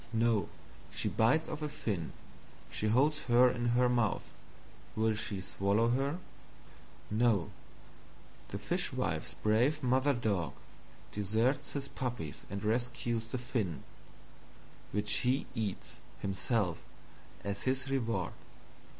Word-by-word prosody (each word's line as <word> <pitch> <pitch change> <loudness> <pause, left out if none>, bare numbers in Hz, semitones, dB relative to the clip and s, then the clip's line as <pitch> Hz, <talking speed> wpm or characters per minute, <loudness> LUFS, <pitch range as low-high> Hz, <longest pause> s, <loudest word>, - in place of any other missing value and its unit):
No, 115 -4 +2 0.4
she - - -1
bites 125 +8 +3
off 155 0 -5
a 150 - -1
Fin, 105 - -3 0.6
she 105 - -1
holds 145 +7 +3
her 120 +1 +6
in 120 -1 -1
her 125 0 +5
Mouth 120 -5 +1 0.6
will 110 0 +3
she 105 -2 -3
swallow 100 +5 +2
her? 135 +6 +1 0.9
No, 110 -4 +3 1.0
the - - -4
Fishwife's - - -1
brave 125 +8 +2
Mother 130 +3 +3
dog 100 - 0 0.6
deserts 115 - +1
his 140 -1 -3
Puppies 120 - -4
and 100 0 -4
rescues 115 0 -1
the 130 - 0
Fin 115 - -2 1.1
which 105 0 +3
he 125 +2 +2
eats, 110 -6 -3 0.2
himself, 95 0 0 0.6
as 100 0 -3
his 130 +1 0
Reward. 115 -4 0
115 Hz, 115 wpm, -33 LUFS, 105-130 Hz, 1.1 s, her